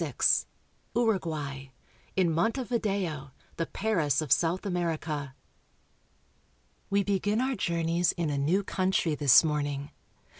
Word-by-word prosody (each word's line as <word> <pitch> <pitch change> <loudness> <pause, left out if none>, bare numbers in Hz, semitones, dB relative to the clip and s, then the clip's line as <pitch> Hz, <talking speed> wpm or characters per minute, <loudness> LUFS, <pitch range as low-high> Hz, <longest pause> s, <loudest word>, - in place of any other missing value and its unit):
20I - - 0
XXVI. - - +3 0.5
URUGUAY— 155 - -1 0.4
IN 180 -3 +2
MONTEVIDEO, 200 - -1 0.3
THE 165 - -1
PARIS 165 -9 0
OF 150 - -8
SOUTH 175 +3 +2
AMERICA. 160 -6 -2 1.5
w, 200 0 +2
E - - -2
begin 205 +2 0
our 260 +2 0
journeys 170 -4 0
in 165 -4 -2
a 140 - -1
new 175 +8 +1
country 185 -4 0
this 145 -2 +6
morning. 145 -2 -2
170 Hz, 120 wpm, -28 LUFS, 150-200 Hz, 1.5 s, this